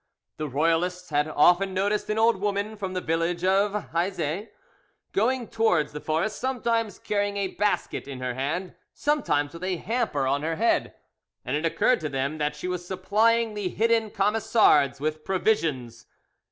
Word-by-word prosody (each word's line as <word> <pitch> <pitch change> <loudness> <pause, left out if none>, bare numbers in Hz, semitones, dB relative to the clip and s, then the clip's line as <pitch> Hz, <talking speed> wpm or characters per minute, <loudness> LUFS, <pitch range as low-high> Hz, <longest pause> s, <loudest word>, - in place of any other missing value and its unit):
The 155 - -3
royalists 165 +5 0
had 145 +1 +2
often 175 +5 +3
noticed 205 +3 0
an 215 - 0
old 225 -1 +4
woman 205 +2 -2
from 190 -3 -5
the 185 - -1
village 165 +2 -1
of 200 +2 +1
Hieuzet 175 +2 -2 0.6
going 240 +3 +1
towards 180 -10 +1
the 150 - -7
forest, 165 +7 -1
sometimes 235 -5 -1
carrying 205 -1 -1
a 195 -1 -1
basket 205 -7 -1
in 135 -2 -7
her 125 -1 -2
hand, 155 +8 -3 0.2
sometimes 205 - 0
with 170 +2 -9
a 185 -1 -1
hamper 220 - -1
on 140 +2 +1
her 165 +2 -1
head, 230 +6 +1 0.5
and 130 - -1
it 155 +3 +1
occurred 250 +9 +2
to 155 - -3
them 140 +3 -2
that 150 0 -1
she 150 +4 -5
was 180 -1 -3
supplying 215 +5 +1
the 205 -3 -2
hidden 225 +1 +1
Camisards 200 - +3
with 155 +1 -3
provisions. 150 - -1
185 Hz, 165 wpm, -26 LUFS, 155-210 Hz, 0.6 s, old